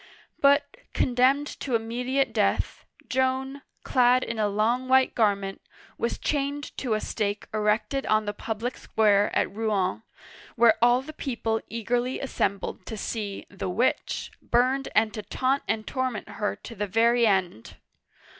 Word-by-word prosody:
" - - -37
But, 285 +8 +3 0.2
condemned 260 +3 +3
to 255 -4 -1
immediate 245 +3 -1
death, 210 -3 0 0.2
Joan, 260 +2 0 0.2
clad 250 0 +4
in 230 -1 -4
a 210 - +2
long 225 +5 0
white 260 0 +4
garment, 200 -3 0 0.3
was 235 - -2
chained 285 0 -2
to 240 -5 0
a - - 0
stake 205 -1 -2
erected 215 +5 0
on 215 0 +2
the 205 - -2
public 225 +4 -4
square 205 -2 +3
of - - 0
Rouen, 210 -3 0 0.5
where 230 -1 +6
all 245 +2 +4
the 310 +3 -9
people 230 -6 -2
eagerly 240 +3 -1
assembled 200 -8 -2
to 220 - -5
see 205 -1 -4
the 195 -1 -4
witch" 225 +8 -1
burned 255 +3 +1
and 220 -1 +3
to 215 - -4
taunt 265 +5 0
and 220 -1 -1
torment 260 -4 -3
her 210 - -2
to - - -10
the 210 -1 -3
very 230 +3 +3
end. 185 - -1
230 Hz, 150 wpm, -26 LUFS, 210-260 Hz, 0.5 s, where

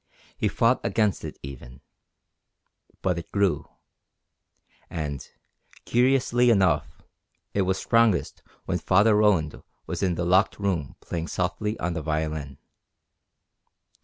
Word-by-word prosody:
He - - 0
fought 115 +5 +2
against 105 -4 +1
it - - -7
even. 65 -2 -10 1.2
But 90 -2 +1
it 85 - -11
grew. 100 -3 0 1.2
And, 75 -5 -4 0.6
curiously 125 0 +3
enough, 95 -6 +2 0.5
it 100 - +1
was 95 0 +1
strongest 115 -6 +2 0.2
when 90 -1 -1
Father 100 +6 +4
Roland 95 -8 +2 0.2
was - - -4
in 90 -3 +1
the 85 - -2
locked 95 +3 +3
room 90 -9 -2
playing 85 -1 -4
softly 105 +6 -2
on 85 0 -1
the 80 - -3
violin. 75 -2 -3
95 Hz, 115 wpm, -25 LUFS, 80-105 Hz, 1.2 s, Father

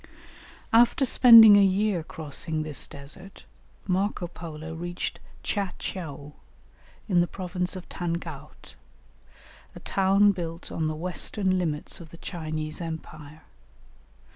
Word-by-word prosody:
After 240 +4 +5
spending 230 -4 +9
a 200 - +6
year 195 -1 +1
crossing 155 0 -5
this 155 -2 -5
desert, 155 +7 -11 0.4
Marco 190 0 -1
Polo 160 -2 -8
reached 175 +2 -5 0.2
Tcha 200 -3 -2
tcheou, 145 -5 -7 0.7
in 180 -5 +3
the 175 - +1
province 180 0 -4
of 185 - -8
Tangaut, 165 -4 -6 1.0
a - - -9
town 195 +1 +3
built 170 -3 -6
on 160 -1 -1
the 155 - -2
western 185 +3 -1
limits 160 0 -3
of 165 -2 -12
the 170 - -13
Chinese 155 -2 -5
empire. 155 -2 -8
175 Hz, 115 wpm, -26 LUFS, 155-190 Hz, 1.0 s, spending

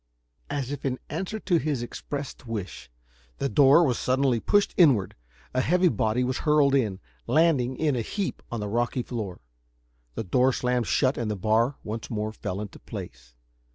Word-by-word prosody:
As 140 -2 -3
if 145 - -5
in 130 -2 -1
answer 190 +7 -3
to 175 - +2
his 145 -6 -1
expressed 140 +1 -6
wish, 105 - -6 0.5
the 140 - -1
door 145 +3 +6
was 130 -7 +1
suddenly 130 -2 +2
pushed 205 - +2
inward, 135 - +4 0.4
a 130 - +2
heavy 180 +5 +3
body 110 +1 0
was 130 +1 -1
hurled 150 -2 +3
in, 110 -9 +1 0.3
landing 130 -3 +2
in 150 -4 +1
a 120 - 0
heap 195 - -3
on 120 -2 -3
the 105 - -3
rocky 120 +3 -1
floor. 105 - -5 0.7
The - - -3
door 125 +7 +2
slammed 125 -2 0
shut 130 -2 +2
and 115 -2 -2
the 105 - -1
bar 110 +7 +2
once 110 +1 -5
more 110 -1 -2
fell 100 -2 -5
into 105 - -8
place. - - -9
125 Hz, 175 wpm, -26 LUFS, 110-145 Hz, 0.7 s, door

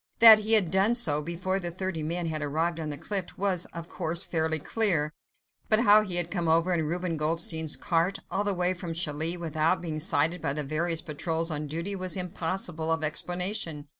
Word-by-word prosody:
That 225 -1 +9
he 215 +1 +1
had 200 -7 +4
done 195 +5 +2
so 150 - +2
before 180 +4 -2
the 175 -2 -3
thirty 185 -1 -4
men 170 +3 -3
had 155 -2 -3
arrived 160 +3 -1
on 155 -1 -4
the 145 - -5
cliff 195 0 -4
was, 190 -3 -1
of 170 0 -9
course, 170 -1 -1
fairly 160 -1 0
clear, 155 -3 +1 0.6
but 215 +1 +4
how 210 -2 +7
he 190 -4 -2
had 175 -1 +2
come 175 -4 -2
over 165 +3 +2
in 160 -3 0
Reuben 175 0 -2
Goldstein's 160 0 +1
cart, 175 0 0
all 195 - 0
the 205 -2 -1
way 180 +1 +1
from 175 -2 -6
Calais, 160 +1 -1
without 160 -1 0
being 160 -3 -5
sighted 160 +1 +1
by 140 - -1
the 150 +1 -3
various 160 +3 -1
patrols 165 +2 -3
on 150 0 -3
duty 170 +7 -4
was 185 0 -3
impossible 175 -2 -3
of 160 -1 -1
explanation. 175 -1 -1
170 Hz, 200 wpm, -27 LUFS, 160-185 Hz, 0.6 s, That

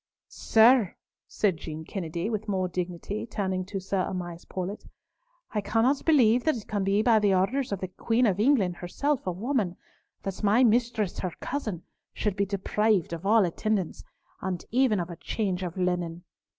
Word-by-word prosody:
"Sir," 225 -3 +4 0.3
said 195 -6 0
Jean 155 0 -7
Kennedy, 170 -1 -4
with 220 -1 -3
more 190 -2 0
dignity, 180 +4 -4
turning 190 -4 -2
to 195 +1 -4
Sir 190 0 -1
Amias 175 -2 -5
Paulett, 190 +3 -5 0.6
"I 210 - -1
cannot 235 +7 +1
believe 250 -6 +5
that 315 -5 +2
it 215 - -9
can 205 -2 -1
be 200 +2 +2
by 225 -2 +5
the 205 -2 +3
orders 240 +8 0
of 200 - -3
the 185 - -2
Queen 225 +6 +1
of 200 -3 +1
England, 210 -8 +3
herself 275 +9 -2
a - - +1
woman, 205 -1 -1 0.5
that 195 -1 -4
my 215 +4 +4
mistress, 230 -4 +1
her 180 -3 -3
cousin, 220 - -4 0.3
should 210 -3 -1
be 200 0 0
deprived 200 -2 +1
of 170 +3 -4
all 220 -1 +5
attendance, 190 +1 -2 0.4
and 180 -2 -3
even 245 -4 +3
of 175 0 -3
a 170 - -8
change 195 -2 -2
of 180 -1 -5
linen. 175 -2 -1
200 Hz, 175 wpm, -27 LUFS, 180-225 Hz, 0.6 s, believe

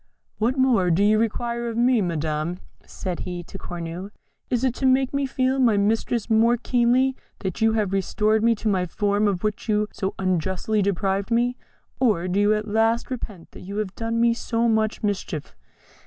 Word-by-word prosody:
"What 240 +5 +1
more 245 -9 +3
do 175 +4 +3
you 215 +1 +4
require 235 +1 -1
of 230 - -5
me, 245 -1 +3
Madam?" 160 -1 -2 0.3
said 180 -3 -5
he 175 -1 -5
to 195 - -10
Cornue. 175 +2 -6 0.4
"Is 245 0 0
it 260 -2 +2
to 265 - +1
make 260 +1 +3
me 280 -1 0
feel 260 +1 0
my 235 -5 +4
miseries 220 +2 0
more 230 +1 +4
keenly 250 +2 +2 0.3
that 190 -1 -4
you 225 0 +4
have 210 -3 0
restored 215 +3 +1
me 230 0 +4
to 220 - -4
my 185 -3 +1
form 205 +4 +1
of 195 -2 -1
which 215 +2 -2
you 210 0 +2
so 190 0 -3
unjustly 190 +3 0
deprived 195 +1 0
me? 240 +1 +1 0.4
or 210 -9 +2
do 185 +2 0
you 205 +1 +4
at 215 +1 -3
last 225 +3 +1
repent 210 -8 -7
that - - -12
you 200 +3 -7
have 210 -3 -2
done 230 +1 -2
me 235 0 +4
so 230 0 -1
much 220 -1 0
mischief?" 195 -7 -3
215 Hz, 190 wpm, -24 LUFS, 190-235 Hz, 0.4 s, you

